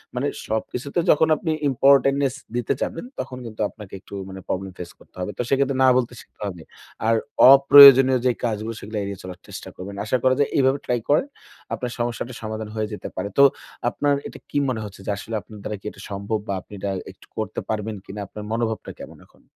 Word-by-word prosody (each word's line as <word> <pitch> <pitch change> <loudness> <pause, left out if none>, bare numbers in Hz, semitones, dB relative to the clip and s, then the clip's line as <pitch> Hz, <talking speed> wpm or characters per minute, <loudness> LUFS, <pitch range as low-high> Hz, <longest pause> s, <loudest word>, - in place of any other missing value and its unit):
মানে - - 0 0.2
সবকিছুতে 125 +7 -2
যখন 155 +1 +4
আপনি 160 - -2 0.2
ইম্পোর্টেন্টনেস 135 0 +4 0.2
দিতে 120 -2 0
যাবেন 165 - -3
তখন 125 - -5
কিন্তু 110 -1 -7
আপনাকে 105 -4 -13
একটু - - -16 0.2
মানে 95 - -8
প্রবলেম 95 0 -3
ফেস 85 -1 -7
করতে - - -22
হবে। 90 +3 -3
তো - - -1
সেক্ষেত্রে 135 -1 +1
না - - +6
বলতে 125 -1 -1
শিখতে - - -24
হবে। 90 -4 -7 0.4
আর 115 - +4 0.4
অপ্রয়োজনীয় 135 -2 +9
যে 125 - +5
কাজগুলো 110 0 -2
সেগুলো 105 +1 -6
এড়িয়ে 100 -1 -5
চলার 90 -1 -8
চেষ্টা - - -8
করবেন। 100 +2 -8
আশা 130 +4 +1
করা 130 0 +4
যায় 145 - +2
এইভাবে 135 0 +3
ট্রাই 120 -1 0
করেন। 150 - +4 0.5
আপনার 125 -2 -3
সমস্যাটার 120 +1 -3
সমাধান 110 0 -5
হয়ে 110 -1 -1
যেতে - - -6
পারে। 100 +2 -3
তো 140 - +8 0.5
আপনার 145 +3 +1
এটা - - -11
কি 145 - -2
মনে 110 -4 -2
হচ্ছে 100 -1 -10
যে - - -1
আসলে 110 +2 -6
আপনার 105 -2 -13
দ্বারা 105 - -4
কি - - -25
এটা - - -14
সম্ভব 100 +2 -2
বা 100 - -1
আপনি 105 - -17
এটা 100 0 -2 0.2
একটু - - -20
করতে - - -3
পারবেন 110 0 -2
কিনা? 105 +2 -8
আপনার 105 +2 -9
মনোভাবটা 115 -1 -2
কেমন - - -10
এখন? - - -27
115 Hz, 205 wpm, -23 LUFS, 105-130 Hz, 0.5 s, অপ্রয়োজনীয়